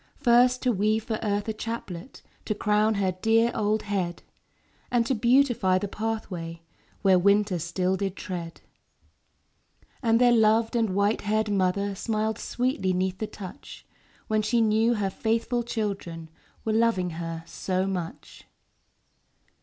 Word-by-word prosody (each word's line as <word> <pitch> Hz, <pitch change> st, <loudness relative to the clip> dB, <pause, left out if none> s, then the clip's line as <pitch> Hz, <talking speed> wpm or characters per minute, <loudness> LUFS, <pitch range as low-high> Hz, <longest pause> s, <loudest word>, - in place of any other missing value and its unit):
First 250 Hz, -1 st, +4 dB
to 250 Hz, -, +3 dB
weave 215 Hz, +1 st, +1 dB
for 220 Hz, -1 st, -3 dB
Earth 205 Hz, -1 st, -1 dB
a 220 Hz, -, -1 dB
chaplet 215 Hz, -2 st, -7 dB, 0.2 s
To 215 Hz, -, -1 dB
crown 210 Hz, +1 st, +2 dB
her 195 Hz, -2 st, +1 dB
dear 225 Hz, +5 st, +2 dB
old 215 Hz, 0 st, 0 dB
head; 190 Hz, -4 st, -2 dB, 0.7 s
And 240 Hz, -2 st, +2 dB
to 265 Hz, -, +1 dB
beautify 240 Hz, -5 st, +3 dB
the 205 Hz, -, -2 dB
pathway 185 Hz, -6 st, -4 dB, 0.4 s
Where 190 Hz, -2 st, +5 dB
winter 200 Hz, -1 st, +3 dB
still 180 Hz, +3 st, -1 dB
did 195 Hz, -1 st, -2 dB
tread. 175 Hz, -5 st, -6 dB, 1.4 s
And 230 Hz, -2 st, +3 dB
their 245 Hz, -1 st, +5 dB
loved 225 Hz, 0 st, +3 dB
and 225 Hz, -5 st, +1 dB
white 200 Hz, +2 st, +2 dB
haired 215 Hz, 0 st, 0 dB
mother 200 Hz, +1 st, +1 dB
Smiled 215 Hz, +2 st, -2 dB
sweetly 250 Hz, -6 st, -1 dB
'neath 185 Hz, +1 st, -1 dB
the 215 Hz, -, -2 dB
touch, 190 Hz, -4 st, -10 dB, 0.4 s
When 215 Hz, 0 st, +1 dB
she 220 Hz, +3 st, +1 dB
knew 225 Hz, +1 st, +3 dB
her 200 Hz, -3 st, -1 dB
faithful 230 Hz, +3 st, 0 dB
children 200 Hz, -8 st, -4 dB, 0.4 s
Were 220 Hz, -, 0 dB
loving 220 Hz, -6 st, +2 dB
her 165 Hz, 0 st, -5 dB
so 185 Hz, +2 st, -2 dB
much. 180 Hz, -4 st, -6 dB
210 Hz, 140 wpm, -26 LUFS, 185-225 Hz, 1.4 s, Where